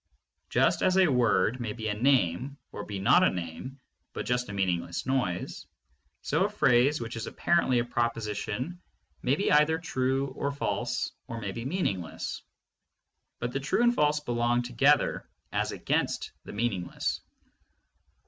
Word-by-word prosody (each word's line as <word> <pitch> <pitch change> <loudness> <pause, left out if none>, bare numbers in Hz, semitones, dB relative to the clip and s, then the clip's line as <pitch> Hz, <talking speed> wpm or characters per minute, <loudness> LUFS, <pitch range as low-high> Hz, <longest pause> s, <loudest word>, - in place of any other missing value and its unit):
Just - - +2
as 185 0 +3
a 190 - +7
word 120 -2 +2
may 115 -3 -3
be 110 -1 -5
a 105 - 0
name 125 +1 +1
or 105 - -6
be 100 -1 -5
not 95 - +5
a - - +5
name 90 +9 -6 0.3
but - - -4
just 125 -2 0
a - - -5
meaningless 90 -3 -1
noise, 125 -10 -2 0.6
so - - +1
a - - +1
phrase 125 +5 +3
which 115 0 -5
is 115 - -4
apparently 170 -7 +2
a 120 - +1
proposition 115 - -2 0.4
may 130 +3 +2
be 200 - 0
either 150 +2 +5
true 135 -4 -1
or 140 - -3
false, 140 - -2 0.2
or 115 - -5
may 100 -3 -4
be 115 +4 -6
meaningless, 100 - -2 1.0
but 120 +1 -3
the 135 - -2
true 150 - +1
and 240 0 +5
false 150 -7 +2
belong 120 -2 0
together 130 +5 +2 0.2
as - - 0
against - - -1
the - - -8
meaningless. 100 -5 -2
120 Hz, 155 wpm, -28 LUFS, 105-140 Hz, 1.0 s, a